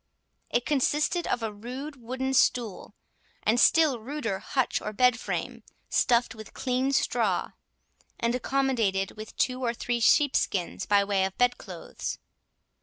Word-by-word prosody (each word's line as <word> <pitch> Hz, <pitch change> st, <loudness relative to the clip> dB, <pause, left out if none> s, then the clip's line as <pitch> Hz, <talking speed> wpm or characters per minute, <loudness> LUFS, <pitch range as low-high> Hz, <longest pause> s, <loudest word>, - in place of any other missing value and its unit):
It 240 Hz, -, 0 dB
consisted 300 Hz, +4 st, +1 dB
of 245 Hz, -, -1 dB
a 220 Hz, -1 st, -3 dB
rude 255 Hz, +8 st, -7 dB
wooden 260 Hz, +3 st, -3 dB
stool, 230 Hz, -6 st, +1 dB, 0.5 s
and 225 Hz, +3 st, +2 dB
still 305 Hz, -3 st, +4 dB
ruder 230 Hz, -5 st, -3 dB
hutch 260 Hz, -3 st, -1 dB
or 210 Hz, -, -5 dB
bed 250 Hz, +1 st, +3 dB
frame, -, -, -4 dB, 0.3 s
stuffed 240 Hz, -1 st, +2 dB
with 220 Hz, -1 st, -12 dB
clean 255 Hz, +1 st, 0 dB
straw, 275 Hz, -, 0 dB, 0.7 s
and 235 Hz, 0 st, +1 dB
accommodated 245 Hz, -7 st, 0 dB
with 215 Hz, 0 st, -10 dB
two 255 Hz, 0 st, 0 dB
or 235 Hz, -1 st, 0 dB
three 240 Hz, 0 st, -2 dB
sheepskins 235 Hz, -, +2 dB
by 200 Hz, -1 st, +4 dB
way 200 Hz, -1 st, +1 dB
of 190 Hz, 0 st, -3 dB
bed 245 Hz, 0 st, +2 dB
clothes. -, -, -6 dB
245 Hz, 140 wpm, -27 LUFS, 215-265 Hz, 0.7 s, still